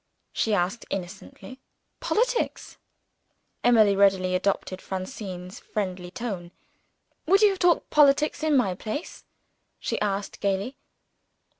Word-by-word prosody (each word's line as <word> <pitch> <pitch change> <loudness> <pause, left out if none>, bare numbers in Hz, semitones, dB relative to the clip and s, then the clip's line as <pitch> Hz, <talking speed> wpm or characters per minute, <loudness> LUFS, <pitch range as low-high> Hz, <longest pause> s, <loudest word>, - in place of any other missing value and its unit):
she 225 - 0
asked 185 +5 -1
innocently. 195 +8 -7 0.4
"Politics?" - - -1 0.8
Emily 220 -4 +5
readily 190 -2 +3
adopted 185 0 -1
Francine's 185 -2 -6
friendly 185 -3 -4
tone. 195 -5 -5 0.8
"Would 390 +5 +5
you 420 - +8
have 385 -1 -3
talked 355 -1 +2
politics, 295 +1 +4
in 310 -2 +3
my 200 -8 +2
place?" 215 - -6 0.5
she - - -3
asked 200 -1 -2
gayly. 200 +6 -1
205 Hz, 110 wpm, -26 LUFS, 185-275 Hz, 0.8 s, you